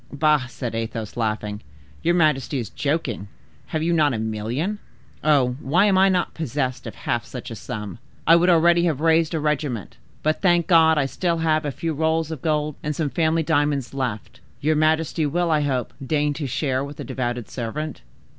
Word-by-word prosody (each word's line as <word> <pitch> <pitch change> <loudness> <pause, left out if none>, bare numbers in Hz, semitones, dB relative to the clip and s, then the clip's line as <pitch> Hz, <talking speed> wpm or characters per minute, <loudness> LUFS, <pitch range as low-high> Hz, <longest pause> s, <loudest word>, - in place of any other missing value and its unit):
"Bah!" 150 -2 +2
said 120 0 -5
Athos, 115 -1 -4
laughing. 110 -2 -2 0.4
"Your 170 +1 +2
majesty 150 -4 +2
is 120 -4 -4
joking; 140 - -2 0.4
have 155 -1 -2
you 170 +1 +1
not 150 -5 +3
a - - -2
million? 110 - -2 0.4
Ah! 150 -3 +5
why 135 +9 +1
am 200 -2 +3
I 190 +1 +5
not 180 -2 0
possessed 135 -4 -3
of - - -7
half - - -2
such - - -8
a - - -5
sum! 105 0 -6 0.3
I 165 - +7
would 175 +2 +4
already 170 0 +5
have 155 -5 0
raised 165 +1 +3
a - - 0
regiment. 145 - -2 0.3
But, 155 +1 +1
thank 175 -3 +3
God! 160 -2 +5
I - - +4
have 135 - -1
still 170 -2 0
a 155 -1 +2
few 165 +4 -3
rolls 160 +1 0
of 155 -5 -5
gold 150 -2 0
and 150 0 -3
some 150 -3 -1
family 165 0 +1
diamonds 145 -5 0
left. 125 -6 -4 0.2
Your 155 +3 +1
majesty 155 0 +2
will, 170 +3 0
I 155 -1 +3
hope, 130 -5 -1
deign 145 +1 +1
to 145 -1 -4
share 130 0 -1
with 145 +2 -8
a - - -4
devoted 120 -3 -3
servant." 145 +6 -5
150 Hz, 195 wpm, -23 LUFS, 130-160 Hz, 0.4 s, I